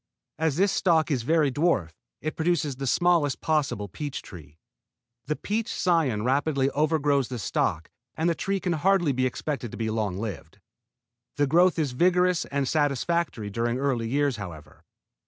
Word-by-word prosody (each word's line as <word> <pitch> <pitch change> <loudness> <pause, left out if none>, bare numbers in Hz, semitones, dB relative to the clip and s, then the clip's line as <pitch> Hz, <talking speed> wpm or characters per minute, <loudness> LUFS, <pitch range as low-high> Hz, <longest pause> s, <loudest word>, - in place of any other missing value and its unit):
As 160 -3 +1
this 195 +4 +3
stock 160 -4 +2
is 130 -4 +1
very 150 +2 +2
dwarf, 135 - +1 0.3
it 155 - -3
produces 160 -4 0
the 135 0 -4
smallest 170 -2 +2
possible 145 -10 0
peach 145 - -6
tree. 80 -5 -12 0.7
The 150 - 0
peach 220 +6 -2
cion 155 -12 +1
rapidly 140 +1 +1
overgrows 145 -3 +1
the 125 - -5
stock 80 -6 -1 0.3
and 160 +2 0
the 170 - +3
tree 195 +4 -2
can 180 -2 -1
hardly 175 -1 +2
be 130 0 +1
expected 135 -1 -4
to - - -9
be 110 -1 -2
long 105 -4 -2
lived. 100 -4 -6 0.8
The 145 - +2
growth 175 +6 +4
is 150 -5 0
very 170 +9 +4
vigorous 180 -1 +1
and 140 -1 -2
satisfactory 145 -5 0
during 120 +3 -1
early 130 -4 -1
years, 140 -1 +1
however. 85 -7 -10
145 Hz, 165 wpm, -26 LUFS, 120-165 Hz, 0.8 s, growth